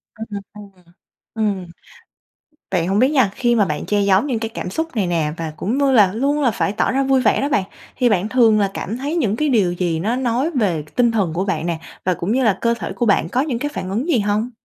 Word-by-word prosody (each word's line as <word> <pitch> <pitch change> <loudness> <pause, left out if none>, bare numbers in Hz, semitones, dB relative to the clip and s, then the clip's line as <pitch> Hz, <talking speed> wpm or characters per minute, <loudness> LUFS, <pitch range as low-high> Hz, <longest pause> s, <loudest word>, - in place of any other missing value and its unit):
Ừm, 220 +1 -7 0.3
ừm. 210 -1 -11 0.7
Ừm. 205 -5 -1 1.1
Vậy 175 -3 +1
hổng 195 +3 +1
biết 260 +2 +4
nha, 260 -9 +3
khi 240 -2 +1
mà 205 -3 +3
bạn 150 -3 -3
che 205 -1 +1
giấu 195 0 +4
những 250 -6 -2
cái 225 -1 -3
cảm 225 - -5
xúc 320 - -4
này 195 -5 0
nè 160 -3 0
và 160 -2 -5
cũng 235 +8 -2
như 280 -1 +2
là 205 -6 +5
luôn 285 +5 0
là 245 -4 +3
phải 200 - -1
tỏ - - 0
ra 270 +1 +1
vui 265 -1 +2
vẻ - - +2
đó 280 - 0
bạn 200 -8 +2 0.3
thì 245 -1 +2
bạn 205 +1 +1
thường 225 -4 +4
là 195 -1 +1
cảm 220 +5 -4
thấy 285 +6 -3
những 225 - +1
cái 300 +3 0
điều 205 -8 +2
gì 170 -3 -1
nó 220 +7 0
nói 255 +4 0
về 190 - 0
tinh 240 -2 +3
thần 195 -8 0
của 185 +3 -1
bạn 185 -4 -2
nè, 170 -2 -2 0.3
và 185 - +2
cũng 175 +5 -3
như 260 +2 +2
là 200 -4 +2
cơ 235 0 +2
thể - - -4
của 240 - -1
bạn 185 -5 +2
có 255 - +1
những 265 -6 -2
cái 290 - -2
phản 185 - -4
ứng 235 - -2
gì 260 - +3
hông? 210 +4 -1
220 Hz, 260 wpm, -20 LUFS, 190-255 Hz, 1.1 s, là